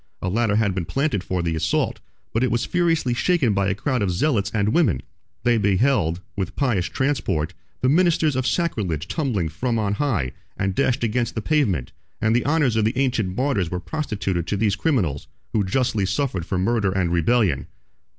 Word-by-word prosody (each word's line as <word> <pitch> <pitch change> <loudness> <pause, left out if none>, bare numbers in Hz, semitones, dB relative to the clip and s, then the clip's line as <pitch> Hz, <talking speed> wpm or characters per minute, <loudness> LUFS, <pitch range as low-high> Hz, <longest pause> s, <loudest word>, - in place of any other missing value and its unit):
A 95 - -2
ladder 110 +1 +1
had 105 -3 +2
been 90 -3 -2
planted 135 - -1
for 90 -2 -2
the 85 -1 -1
assault, 80 - 0 0.3
but 115 - +1
it 130 - +2
was 120 - 0
furiously 165 -8 +1
shaken 135 - +2
by 100 -1 +1
a 95 - 0
crowd 125 +3 -1
of 100 - +1
zealots 100 - +1
and 105 -1 +1
women: 155 - +2 0.4
they 120 -1 +3
beheld, 100 - +2
with 95 -3 -3
pious 120 -11 +1
transport, 100 - -1 0.3
the 130 - +2
ministers 160 -1 +3
of 130 0 0
sacrilege 95 - -1
tumbling 125 - -1
from 115 +10 -2
on 105 -2 0
high 105 - 0 0.3
and 100 -1 0
dashed 130 +3 +1
against 120 +1 0
the 110 - -1
pavement: 105 - +1 0.3
and 110 +1 +2
the 120 - +1
honors 145 -5 +2
of 110 - +2
the 115 +4 0
ancient 115 -8 0
martyrs 125 - +1
were 90 - -3
prostituted 100 - -3
to 100 - -1
these 105 -1 +1
criminals, 100 - 0 0.3
who 105 - +2
justly 110 0 0
suffered 100 - -1
for 95 - -1
murder 100 +1 +1
and 95 -3 0
rebellion. 85 - +2
110 Hz, 190 wpm, -23 LUFS, 95-130 Hz, 0.4 s, they